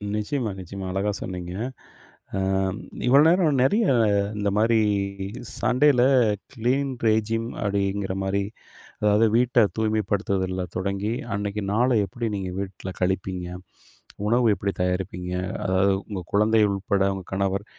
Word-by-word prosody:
நிச்சயமா, 110 +1 -2
நிச்சயமா. 95 +1 -7
அழகா 100 +2 0
சொன்னீங்க. 90 -1 -5 0.8
அ - - 0 0.7
இவ்வளோ 140 +3 +7
நேரம் 165 -6 +3
நெறைய 210 - +3 0.5
இந்தமாரி 105 +3 +2 0.8
சண்டேயில, 130 0 +4 0.5
"கிளீன் 130 +3 0
ரெஜிம் 110 +1 +1 0.2
அப்படீங்கிறமாரி, 100 -1 -1 0.6
அதாவது 105 +2 +4
வீட்ட 120 -2 +4
தூய்மைப்படுத்துவதுல 100 -4 0
தொடங்கி, 100 +3 -2 0.2
அன்னைக்கு 100 0 -3
நாள 125 +4 +3 0.2
எப்படி 115 +5 -5
நீங்க 95 -2 -4
வீட்ல 95 -1 -6
கழிப்பீங்க? 95 -1 -1 0.8
உணவு 120 +1 +3
எப்படி 100 0 -2
தயாரிப்பீங்க? 90 0 -2 0.3
அதாவது 95 +1 +3 0.2
உங்க 95 -3 -4
குழந்தை 110 +2 +4
உட்பட, 100 0 0
உங்க 95 -2 -7
கணவர் 100 +1 -1
100 Hz, 110 wpm, -24 LUFS, 95-115 Hz, 0.8 s, இவ்வளோ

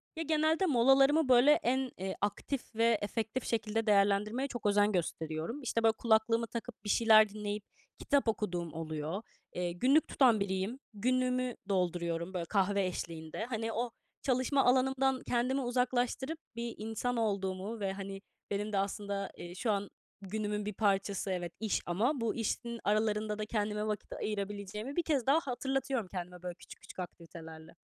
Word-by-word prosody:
Ya, 325 - -2
genelde 315 +3 +2
molalarımı, 270 +1 +5
böyle, 255 +3 +7
en, 260 -2 +2
eee, 190 +1 -3
aktif 220 +5 -3
ve 230 0 +4
efektif 220 +4 -2
şekilde 225 0 -1
değerlendirmeye 210 +5 +3
çok 240 -5 -7
özen 205 0 +4
gösteriyorum. 165 - -2
İşte, 230 -3 -1
böyle, 225 - +6
kulaklığımı 230 +1 +2
takıp 235 0 -7
bir 205 - -5
şeyler 220 -1 +6
dinleyip 210 0 -4 0.4
kitap 280 -3 +2
okuduğum 180 -7 -1
oluyor. 160 +3 -4 0.3
Eee, 175 -1 -1
günlük 260 - +3
tutan 245 -6 +4
biriyim. 200 +5 -2
Günlüğümü 255 +3 +1
dolduruyorum, 175 -2 -1
böyle, 175 -2 -2
kahve 200 +1 +2
eşliğinde. 165 +1 -4
Hani, 225 -2 -3
o 240 +1 -1 0.3
çalışma 260 +1 +2
alanımdan 265 +1 +3
kendimi 255 +3 +1
uzaklaştırıp 250 +4 0 0.2
bir 235 0 -4
insan 225 +3 -2
olduğumu 200 0 -1
ve, 195 -2 -1
hani, 195 0 -6 0.3
benim 205 +1 -2
de - - +2
aslında, 200 0 -2
eee, 175 0 -8
şu 220 +4 0
an 200 -1 -1 0.3
günümün 210 +1 -3
bir 210 - -3
parçası, 195 -1 0
evet, 175 -2 -3
iş 220 -3 0
ama 230 - +1
bu 230 -1 0
işin 235 +1 -2
aralarında 210 0 +1
da 215 - -1
kendime 210 -1 -1
vakit 210 -1 -3
ayırabileceğimi 205 +4 -4
bir 345 - +1
kez 285 -7 +1
daha 280 +4 +5
hatırlatıyorum 265 - -2
kendime, 180 -1 -7
böyle, 180 -1 -4
küçük - - -14
küçük - - -12
aktivitelerle. 165 -2 -9
215 Hz, 155 wpm, -32 LUFS, 195-245 Hz, 0.4 s, böyle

